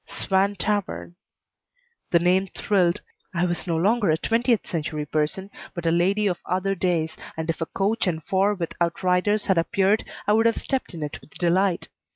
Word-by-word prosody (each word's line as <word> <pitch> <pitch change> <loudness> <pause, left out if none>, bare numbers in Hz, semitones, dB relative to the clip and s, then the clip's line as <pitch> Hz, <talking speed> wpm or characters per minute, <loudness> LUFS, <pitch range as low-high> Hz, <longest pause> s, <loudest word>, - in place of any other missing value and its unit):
"Swan 195 +1 +1
Tavern." 205 -3 -2 1.0
The 170 - +5
name 180 +3 +3
thrilled. 185 -2 +1 0.3
I 170 +1 +2
was 175 +1 -2
no 165 -2 +1
longer 205 +3 +2
a 155 - +3
twentieth 230 +4 +1
century 155 -2 -3
person, 155 +7 -1 0.2
but 170 -1 -5
a 165 - +3
lady 190 +5 +2
of 180 -4 0
other 185 +2 0
days, 170 -4 0 0.2
and 160 0 -3
if 165 - -9
a 165 - -1
coach 200 +2 0
and 160 -3 -1
four 195 +4 +2
with 170 -4 -4
outriders 180 +4 +1
had 190 -3 +3
appeared 195 +4 +2 0.2
I 210 - +3
would 225 +1 +4
have 230 - +1
stepped 260 -8 -2
in 160 - -4
it 145 - -6
with - - -18
delight. 180 +1 +1
185 Hz, 185 wpm, -24 LUFS, 170-200 Hz, 1.0 s, The